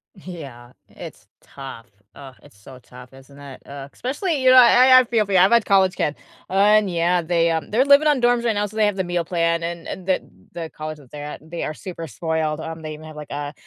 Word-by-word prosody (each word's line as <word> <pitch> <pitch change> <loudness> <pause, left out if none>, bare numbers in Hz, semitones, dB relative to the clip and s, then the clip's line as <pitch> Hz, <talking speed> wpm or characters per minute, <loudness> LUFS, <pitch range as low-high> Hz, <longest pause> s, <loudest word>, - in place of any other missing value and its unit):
Yeah, 140 -10 -11 0.2
it's - - -12
tough. 135 -4 -11 0.3
Ugh, 135 -2 -12
it's 100 - -20
so 130 +5 -14
tough, 125 +1 -15
isn't 135 +1 -17
it? 140 -2 -12
Ugh, 140 0 -9
especially, 290 +4 -3
you 260 - +4
know, 255 - +7
I 255 +1 +7
I - - +3
feel 230 -2 0
for 200 - -5
you, 185 - +4
I've 190 +4 +5
had 235 -2 +4
college 190 -2 +3
kids, 150 - -2 0.3
and 205 +2 +3
yeah, 175 0 +1
they, 170 0 +1
um, 160 -1 -3
they're 250 +6 +2
living 285 +2 +5
on 285 -4 +2
dorms 240 0 +2
right 230 -2 +1
now, 205 0 0
so 210 - -10
they 215 -1 +2
have 205 - -1
the 190 - -2
meal 175 -1 -2
plan, 170 -1 -1
and 170 0 -6
and 185 0 -8
the 185 - +1 0.3
the 165 -2 -6
college 155 0 -7
that 140 -4 -19
they're 145 -1 -8
at 150 +1 -9
they 170 - -4
are 155 - -4
super 170 -3 -8
spoiled, 155 +4 -3
um, 160 0 -7
they 155 -1 -6
even 155 - -13
have, 155 -1 -11
like, 150 -1 -10
a, 145 0 -5
170 Hz, 245 wpm, -21 LUFS, 150-205 Hz, 0.3 s, know